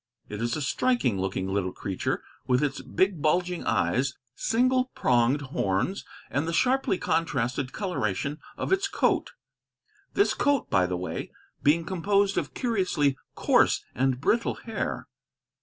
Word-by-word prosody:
It 105 +1 -5
is 120 0 0
a 150 - -2
striking 135 - +1
looking 95 0 -2
little 95 -1 -1
creature, 95 0 -3 0.2
with 125 +2 +3
its 140 -2 -1
big 185 -4 0
bulging 175 +3 +1
eyes, 130 +1 +1 0.2
single 255 - +2
pronged 125 +3 +3
horns, 95 - 0 0.3
and 140 +5 0
the 165 - -2
sharply 255 0 +2
contrasted 130 -7 -1
coloration 150 - -2 0.2
of - - 0
its 385 +1 +2
coat; - - +1 0.8
this 400 - +3
coat, 285 -3 +1
by 90 -1 +4
the 90 0 -2
way, 90 - -5 0.3
being 160 +3 +3
composed 200 +2 +1
of - - -6
curiously 185 - +1 0.2
coarse - - +3
and 130 0 +1
brittle 230 - +1
hair. 220 - -4
150 Hz, 140 wpm, -27 LUFS, 120-200 Hz, 0.8 s, by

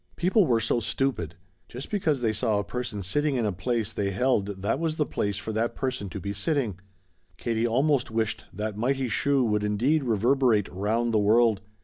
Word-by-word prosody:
People 185 +1 +3
were 115 -2 +3
so 110 +2 +1
stupid. 110 - -2 0.3
Just 125 +3 -8
because 160 -10 0
they 110 -2 +1
saw 110 -1 0
a 100 - 0
person 120 -2 -4
sitting 145 +10 0
in 120 -3 0
a 105 - +1
place 110 +4 -2
they 100 -1 -1
held 105 0 +1 0.2
that 115 +6 0
was 165 -1 -1
the 150 - +1
place 100 -6 -2
for 110 +2 -5
that 115 +2 -1
person 125 -7 -3
to 100 - -6
be 100 +2 -4
sitting. 110 - -1 0.6
Katie 115 0 0
almost 135 +3 +2
wished 110 -1 -2
that 105 +2 -4
mighty 130 +3 0
"Shoo!" 140 +3 +2
would 105 -3 +1
indeed 125 +9 +1
reverberate 120 -1 +2
'round 110 +5 0
the 110 - +4
world. 110 0 +3
115 Hz, 195 wpm, -26 LUFS, 105-135 Hz, 0.6 s, the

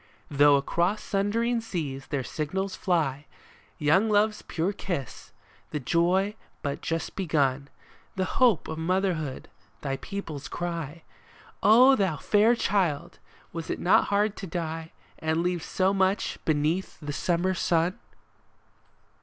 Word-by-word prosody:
Though 145 0 +6
across 175 +9 0
sundering 230 +4 0
seas 145 -11 -4
their 140 -2 -2
signals 185 +8 -3
fly; 150 -6 0 0.5
Young 160 +9 +3
Love's 210 0 +2
pure 175 +4 -2
kiss, 170 - -5 0.4
the 150 - -3
joy 175 +8 +2 0.3
but 140 -2 -3
just 165 0 -3
begun, 145 -6 0 0.5
The 190 -1 0 0.2
hope 235 -9 +4
of 160 0 -5
motherhood, 170 -5 -1 0.3
thy 135 -2 -2
people's 160 -8 -6
cry 170 -2 -5 0.3
— - - -25 0.2
O 260 +2 +8
thou 190 - 0
fair 215 +9 +4
child! 185 -10 0 0.3
was 165 -1 -5
it - - -1
not 180 - +4
hard 205 +1 +1
to 195 - -6
die 165 -1 -4 0.3
And 160 +1 0
leave 180 -1 0
so 190 +5 +1
much 190 +1 +1
beneath 155 +4 0
the 145 -2 -5
summer 175 +4 0
sun 175 +3 +1
170 Hz, 130 wpm, -27 LUFS, 150-195 Hz, 0.5 s, O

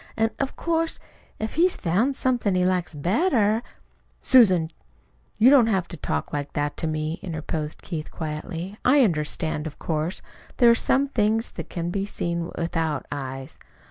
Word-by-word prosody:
"An' 225 0 +2
of 275 -1 -2
course, 330 -1 -1 0.4
if 220 0 -4
he's 350 +3 +3
found 215 +11 +1
somethin' 240 -8 +1
he 180 0 +2
likes 180 -3 0
better 215 - +2 0.3
" - - -39 0.3
"Susan, 185 -11 +5 0.7
you 240 +5 +6
don't 260 -5 +6
have 190 -5 +1
to - - -6
talk 75 - -3
like 145 -1 -3
that 145 0 -1
to 165 - -2
me" 155 +1 -2
interposed 155 -3 -4
Keith 160 -4 -5
quietly. 165 +5 -5
"I 275 +2 +5
understand, 155 -4 -1
of 150 - -9
course. 160 +3 -2 0.3
There 240 -2 +7
are - - +7
some 270 +4 +2
things 225 -2 +1
that - - -8
can 170 -1 -3
be 195 +1 -2
seen 170 -3 -3
without 165 -3 -1
eyes." 135 -2 -6
180 Hz, 165 wpm, -24 LUFS, 155-230 Hz, 0.7 s, There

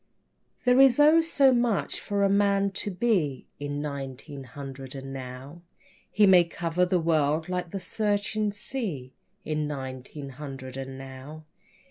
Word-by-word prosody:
There 250 +1 +5
is 270 -1 +6
oh, 305 +3 +7
so 280 -5 +4
much 240 -4 0
for 200 -1 -1
a - - +5
man 200 0 +2
to 200 +1 -3
be 180 - 0
In 145 0 -3
nineteen 140 -1 -6
hundred 135 +1 -8
and 135 0 -7
now. 130 +5 -8 0.5
He 210 - +4
may 185 -3 +7
cover 170 +1 -1
the 180 0 +2
world 160 -1 +1
like 180 -1 -2
the 195 - -4
searching 210 +2 0
sea 200 - -5 0.3
In 155 -1 -1
nineteen 135 0 -6
hundred 135 -1 -8
and 135 0 -6
now. 135 +4 -10
160 Hz, 145 wpm, -27 LUFS, 135-200 Hz, 0.5 s, oh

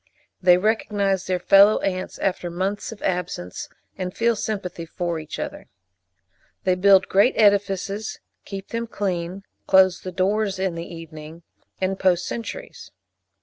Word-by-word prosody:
They 180 -1 +6
recognise 200 -2 0
their 185 -1 +1
fellow 200 +4 +6
ants 185 -1 -3
after 180 -2 -1
months 190 +5 -3
of 220 - -10
absence, 175 - -3 0.3
and 185 0 -5
feel 235 0 +2
sympathy 195 -5 -4
for 170 0 -3
each 155 - -7
other. - - -6 1.0
They 185 - +3
build 190 +1 +5
great 200 +7 +4
edifices, 200 0 +2 0.3
keep 195 -1 -8
them 230 0 -3
clean, 185 -3 -3 0.2
close 190 -1 +5
the 185 - -6
doors 195 +2 0
in 190 -1 -1
the 170 +1 -7
evening, 165 0 -10 0.4
and 190 0 -1
post 180 -2 +2
sentries. 235 - -6
190 Hz, 140 wpm, -23 LUFS, 180-200 Hz, 1.0 s, They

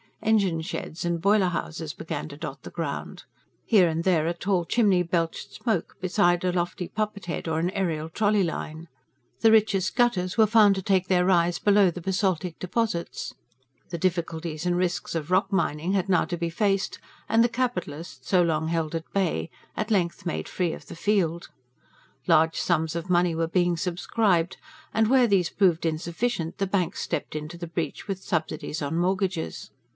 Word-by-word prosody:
Engine 200 -7 +2
sheds 160 0 -5
and 170 -1 -1
boiler 200 0 +4
houses 160 -3 -4
began 160 - -5
to 145 - -10
dot 150 -3 -6
the - - -9
ground; 165 -5 -5 0.4
here 200 -6 +5
and 165 0 -1
there 165 -4 +2
a 170 - +1
tall 180 -1 0
chimney 200 -3 +3
belched 170 -1 -2
smoke, 220 -8 -2
beside 180 -1 +2
a 180 - +2
lofty 175 0 -2
poppet 215 -2 -3
head 170 - -4
or 160 -1 0
an 175 +3 0
aerial 170 -6 -1
trolley 205 +3 +2
line. 165 -1 -4 0.5
The 225 - +6
richest 210 -4 +3
gutters 210 -7 +1
were 220 -1 +6
found 210 -2 +6
to 190 - -3
take 190 -2 +2
their 180 -1 +3
rise 175 -2 +3
below 205 -2 +5
the 180 - -8
basaltic 185 -2 -1
deposits; 185 -2 -2 0.6
the 170 - -4
difficulties 165 -2 -2
and 175 0 +2
risks 180 -1 -1
of 160 +1 -3
rock 185 +3 +2
mining 180 -2 0
had 195 -1 0
now 180 -3 +3
to 175 - -4
be 170 0 -2
faced, 195 +2 0 0.3
and 225 +1 +4
the 240 - +3
capitalist, 230 - -3
so 185 -2 +4
long 160 -1 0
held 165 -1 -1
at 165 0 -5
bay, 190 -4 0 0.3
at 215 +1 -3
length 180 -4 0
made 170 - -3
free 175 -3 -1
of - - -9
the - - -9
field. 170 -3 0 0.8
Large 160 +1 +4
sums 160 -2 0
of 170 +2 -4
money 175 -1 +3
were 165 0 0
being 175 0 +2
subscribed; 180 +1 0 0.4
and, 220 0 +3
where 255 -2 +5
these 190 -5 +2
proved 175 -5 +2
insufficient, 170 +3 -2
the 195 -1 0
banks 185 -3 -1
stepped - - -3
into 155 +3 -5
the 170 0 -6
breach 160 +1 -4
with 195 -2 -3
subsidies 160 -2 -2
on 145 +3 -2
mortgages. 185 -1 -1
180 Hz, 180 wpm, -26 LUFS, 165-195 Hz, 0.8 s, The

